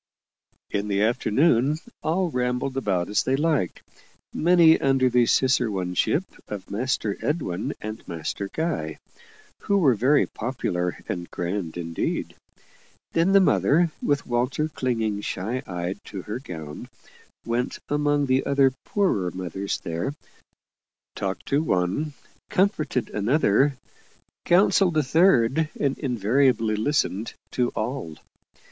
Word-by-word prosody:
In 100 0 -1
the 100 0 +1
afternoon, 125 +5 +2 0.2
all 175 +2 0
rambled 125 +1 -1
about 95 -9 0
as 105 - +1
they 130 - +1
liked 150 - 0 0.5
many 170 -1 +5
under 135 -2 +3
the 120 -1 +4
ciceroneship 110 - +1 0.2
of 100 -2 -7
Master 110 -1 -1
Edwin 125 - -2
and 110 +1 -7
Master 85 +4 -4
Guy, 155 - -2 0.6
who 200 - +1
were 150 -9 +5
very 130 +7 +3
popular 90 -7 -3
and 85 -1 -4
grand 90 -1 -3
indeed. 85 -1 -3 0.8
Then 170 +4 +2
the 200 - +8
mother, 170 -3 +3
with 145 0 0
Walter 125 +6 0
clinging 115 -7 -1
shy 110 +7 -3
eyed 90 +2 -4
to 95 -3 -7
her 110 +3 -5
gown, 80 - -8 0.6
went 120 +2 -1
among 145 0 +1
the 130 0 +2
other 135 -2 +3
poorer 180 - +1
mothers 95 +2 -4
there; 85 - -3 1.0
talked 95 -1 -3
to 140 +2 +2
one, 140 - 0 0.4
comforted 155 - 0
another, 130 +4 +2 0.7
counselled 180 -1 +4
a 155 - +3
third, 155 -1 +3
and 140 -2 +1
invariably 120 -2 +2
listened 110 -3 -1 0.2
to 125 -1 +1
all. 110 - -3
125 Hz, 120 wpm, -25 LUFS, 100-145 Hz, 1.0 s, the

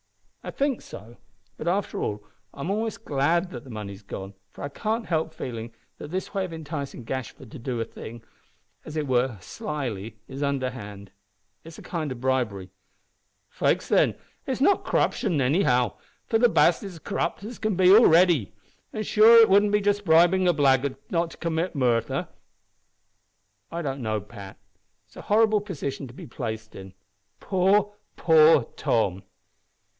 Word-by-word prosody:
"I - - -6
think 275 -3 -1
so; 115 +3 -12 0.4
but, - - -6
after 190 +3 -1
all, 105 0 -3 0.3
I'm 140 +7 -4
almost 220 +2 -3
glad 165 +6 +1
that 120 -1 -8
the 135 - -13
money's 100 -3 -7
gone, 95 -1 -8 0.2
for - - -11
I 140 - -3
can't 220 +9 -2
help 160 -1 -1
feeling 115 -2 -6 0.3
that - - -8
this 185 +3 -4
way 195 - 0
of 185 - -5
enticing 150 -5 -6
Gashford 130 0 -6
to 145 - -9
do 120 0 -3
a 115 - -1
thing, 115 0 -10 0.6
as 155 - -7
it 150 - -1
were 125 -3 +1
slily, 115 -2 -5
is 135 +1 -7
underhand. 125 -8 -4 0.5
It - - -15
is 165 - -11
a - - -11
kind 155 -5 -4
of 125 - -6
bribery." 120 -8 -1 0.8
"Faix, - - 0
then, - - +3 0.3
it's 260 - -2
not 385 +9 +3
c'ruption 165 -6 0
anyhow, 125 -3 +2 0.3
for 225 - +1
the 240 0 +5
baste 175 - +3
is 195 -3 -7
as 165 - -13
c'rupt 170 +3 -3
as 225 +3 -7
he - - -27
can 215 -3 0
be 185 0 +5
already. 175 - +5 0.4
An', 215 - -3
sure, 225 +2 +7
wouldn't 205 +1 +4
it 210 - +2
just 205 0 +1
be - - -7
bribin' 175 +3 +5
a 175 - +4
blackguard 140 -2 +2 0.2
not 170 -1 +1
to - - -13
commit 170 +1 -2
murther?" 120 -4 0 1.4
"I 170 +1 -4
don't 135 -2 -3
know, 110 -2 -1
Pat. 100 -2 -11 0.5
It 105 - -37
is - - -18
a - - -7
horrible 215 0 +3
position 140 -8 -5
to 120 - -13
be - - -9
placed 110 -3 -6
in. 95 0 -11 0.4
Poor, 200 +2 +2 0.2
poor 160 -4 +5
Tom!" 95 -5 0
145 Hz, 170 wpm, -25 LUFS, 120-185 Hz, 1.4 s, sure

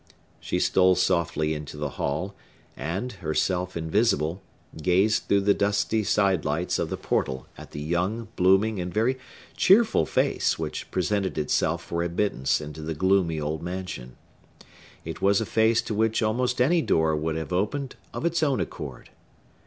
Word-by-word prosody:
She - - -2
stole 95 -1 +4
softly 85 -4 +1
into 75 -1 -7
the 75 -2 -3
hall, 85 +8 -2 0.4
and, 90 - -3
herself 90 0 -1
invisible, 85 0 +1 0.4
gazed 95 +6 +2
through 100 0 +3
the 100 +1 +4
dusty 100 +2 +1
side 95 -5 +2
lights 80 +5 -1
of - - -1
the - - -3
portal 65 0 -1
at - - -11
the - - -7
young, 90 +9 -1
blooming, 95 +3 +3
and 90 0 -4
very 120 +6 +1 0.4
cheerful 220 +4 +4
face - - +1
which - - -5
presented 95 0 -1
itself 80 +2 0
for 85 0 -3
admittance 85 -5 0
into 75 +1 -8
the 80 +1 -4
gloomy 95 -1 +2
old 75 +1 -3
mansion. 85 -9 -6 0.9
It 80 0 -6
was 100 0 +4
a 110 - -1
face 110 +3 +2
to - - -4
which 110 +1 +1
almost 125 +3 0
any 165 +7 +4
door 80 - +2
would 80 +1 -2
have 80 +2 -4
opened 125 +9 -1 0.2
of - - -4
its 170 -1 +1
own 140 -4 +2
accord. 70 -6 -6
90 Hz, 160 wpm, -26 LUFS, 80-110 Hz, 0.9 s, stole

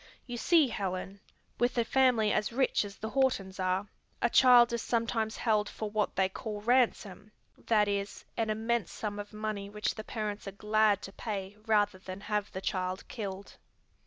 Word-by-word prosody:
You 245 - -6
see, 310 +4 +4
Helen, 195 -1 -4 0.4
with 245 +1 +1
a 235 - +2
family 250 -6 +3
as 210 +1 0
rich 260 -1 +2
as 200 -1 -8
the 220 - -5
Hortons 225 -8 0
are, 185 +2 0 0.3
a 240 - +1
child 245 -2 +7
is 235 - -1
sometimes 225 -1 -1
held 215 -3 +1
for 215 -1 -5
what 210 -1 0
they 190 - +3
call 210 +2 -6
ransom; 215 -4 +1 0.2
that 210 -2 +2
is, 200 0 -3
an 225 -2 -1
immense 225 -1 -1
sum 205 -1 -4
of 205 0 -7
money 210 -2 -4
which 210 +1 -2
the 215 - -7
parents 210 -2 -4
are 195 - -5
glad 210 0 +2
to 195 - -7
pay 200 -2 -5
rather 205 -3 +2
than 185 +1 -8
have 210 0 -2
the 190 - -5
child 185 -1 -2
killed." 200 -3 -6
210 Hz, 180 wpm, -30 LUFS, 200-230 Hz, 0.4 s, child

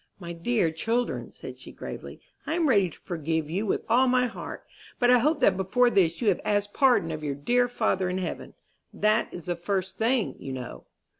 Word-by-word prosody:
"My 170 -2 -6
dear 170 0 +1
children," 230 +9 -2
said - - -10
she, - - -11
gravely, - - -8 0.3
"I 320 - 0
am 335 -2 +2
ready 200 -8 +4
to - - -15
forgive 160 -2 -2
you 200 +5 -1
with - - 0
all 250 +3 +4
my 250 0 +3
heart; 240 - -7 0.3
but 245 0 +4
I 250 - +6
hope 300 +6 +2
that 190 - +5
before 240 +6 +2
this 180 0 +2
you 215 - +4
have 190 - +1
asked 205 0 0
pardon 245 -12 +3
of 155 -1 -5
your 145 -2 -2
dear 245 - +2
Father 205 -6 0
in 180 - -2
heaven. 185 -2 -5 0.4
That 215 +2 +1
is 175 - -8
the 175 - -1
first 190 +2 -3
thing, 230 0 +1
you 135 - -6
know." 125 -1 -7
200 Hz, 210 wpm, -27 LUFS, 170-245 Hz, 0.4 s, I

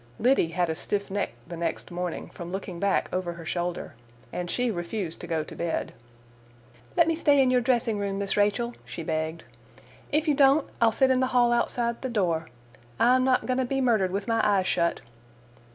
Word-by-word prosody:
Liddy 250 -6 +3
had 175 +1 0
a 160 - -1
stiff 200 +4 -2
neck 200 0 -1
the 170 - -6
next 170 +1 -3
morning, 175 -1 -4
from 170 0 -8
looking 190 -2 -5
back 200 +1 +1
over 180 -1 -1
her 170 -1 -10
shoulder, 175 +1 -3 0.4
and 175 -1 -3
she 245 +3 0
refused 175 -1 -4
to 175 - -7
go 160 -2 -1
to - - -11
bed. 170 -1 -2 1.0
"Let 340 - +6
me 330 - +2
stay 290 -3 +3
in 260 -2 +4
your 250 -1 +3
dressing 235 -3 +1
room, 200 -1 -2
Miss 200 0 -1
Rachel," 210 +4 +1
she 165 - -7
begged. 160 +1 -2 0.7
"If 310 +2 +1
you 300 - +4
don't, 275 +1 +4
I'll 230 -1 +5
sit 265 +4 +3
in 255 - +3
the 260 - +2
hall 240 -1 +5
outside 235 0 0
the 260 - -3
door. 170 -8 0 0.5
I'm 255 +2 +5
not 255 -1 +2
going 255 0 0
to - - +2
be 270 +2 -1
murdered 225 -7 +2
with 195 +2 -3
my 230 -1 +2
eyes 200 -3 +3
shut." 170 -2 +1
205 Hz, 200 wpm, -27 LUFS, 175-250 Hz, 1.0 s, Let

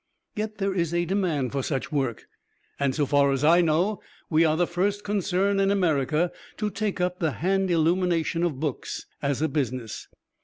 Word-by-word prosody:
Yet 215 0 -3
there 195 -1 0
is 170 -2 -1
a 175 0 +1
demand 170 -9 0
for 140 - -1
such 135 +2 -3
work; 135 -6 -1 0.5
and 140 -2 +1
so 150 - +1
far 140 0 +3
as 135 +1 -1
I 170 +3 +6
know, 175 +5 +1 0.3
we 160 +1 +5
are 155 -1 +2
the 175 - +3
first 200 +4 -1
concern 200 -1 +1
in 195 0 +3
America 165 -3 +1 0.3
to 210 -1 -1
take 210 -3 -2
up 180 0 -1
the 160 -5 0
hand 190 +2 0
illumination 170 0 +1
of 165 -6 -1
books 150 -4 -4 0.2
as 140 +1 0
a - - +3
business. 130 -6 -3
170 Hz, 185 wpm, -26 LUFS, 145-190 Hz, 0.5 s, I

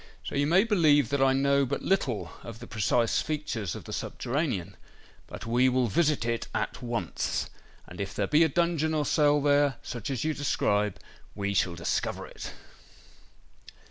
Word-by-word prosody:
So - - -6
you 140 +1 +1
may 180 +5 +5
believe 155 - +4
that 140 -1 0
I 135 0 +5
know 140 +1 +3
but 130 - -2
little 135 - 0
of 115 -2 -9
the 120 - -10
precise 115 +1 +1
features 120 - -3
of - - -8
the - - -8
subterranean. 125 - -2 0.5
But - - -8
we 120 +3 +3
will 130 0 +2
visit 145 - +1
it 115 -1 -2
at - - -2
once; 115 -8 -2 0.3
and - - -8
if 100 - -5
there 100 - 0
be 150 +9 +4
a 160 - +3
dungeon 160 0 +1
or 150 -1 +1
cell 150 0 +3
there, 145 -1 +3
such 120 0 -5
as 130 -4 -2
you 155 0 0
describe, 105 -8 0 0.4
we 100 -1 -2
shall 90 -3 +1
discover 85 - -2
it." - - -8
135 Hz, 175 wpm, -28 LUFS, 115-150 Hz, 0.5 s, may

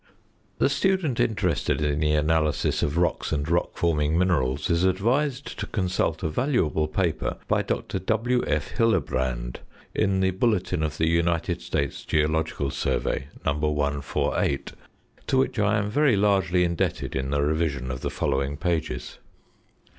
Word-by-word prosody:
The - - +3
student 185 - +1
interested 100 -8 +1
in 75 -1 0
the 75 -1 +2
analysis 75 0 +1
of 75 +3 0
rocks 85 0 0
and 75 -1 -1
rock 85 +1 0
forming 80 -2 +1
minerals 75 -7 +1
is 85 +1 +2
advised 125 +9 0
to - - -3
consult 90 -4 -1
a - - +1
valuable 80 - +1
paper 85 +1 -1
by - - +2
Dr. - - -3
W.F. 110 -9 0
Hillebrand 65 - 0 0.4
in 95 -1 +1
the 95 0 +3
Bulletin 95 -4 0
of 75 -1 -2
the 80 - +1
United 85 +1 +1
States 70 -2 -2
Geological 80 -2 0
Survey, 65 - -1 0.2
No. 70 - +2
148, 70 -2 -1 0.6
to 130 - +2
which 130 -3 +1
I 105 +2 +3
am 105 -1 -1
very 145 -1 +3
largely 95 -3 +3
indebted 85 -1 -1
in 65 0 -2
the 70 0 +1
revision 75 -4 -1
of 65 0 -5
the - - -2
following 70 0 -1
pages. 80 -8 -2
80 Hz, 145 wpm, -25 LUFS, 75-95 Hz, 0.6 s, The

